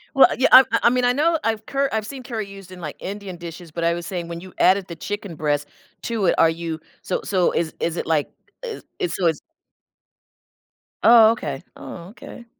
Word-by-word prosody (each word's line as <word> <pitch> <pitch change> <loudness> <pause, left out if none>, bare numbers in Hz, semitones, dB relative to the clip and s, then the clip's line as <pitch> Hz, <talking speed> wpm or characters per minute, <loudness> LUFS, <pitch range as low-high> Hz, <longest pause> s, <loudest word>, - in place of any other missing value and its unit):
Well, 270 - +8
yeah, 260 - +4
I 260 - +11 0.2
I - - +7
mean 250 +1 +1
I 245 - +3
know 320 +5 +2
I've 220 -1 -1
curr 275 0 0
I've 220 -1 -1
seen 260 +2 -8
curry 225 -5 -4
used 195 -2 -12
in, 180 -1 -10
like, 150 -3 -6
Indian 195 -1 -6
dishes, 170 0 -9
but 170 +2 -4
I 170 0 +3
was 170 0 -5
saying, 175 -3 -4
when 170 0 -6
you 185 0 -12
added 190 0 +4
the 170 - -7
chicken 205 0 -5
breast 145 -1 -1 0.4
to 225 -4 -1
it, - - +3
are 165 - +5
you 165 -1 -4 0.2
so 185 - -2
so 185 -3 +1
is 165 -1 -1
is 170 0 -2
it - - -2
like 155 -3 +1 0.3
is 470 -3 -6 0.3
so 180 - +1
it's 160 -2 0 1.6
Oh, 225 -1 +8
okay, 145 - -4
oh, 170 0 -9
okay 235 +2 -12
190 Hz, 210 wpm, -22 LUFS, 170-230 Hz, 1.6 s, I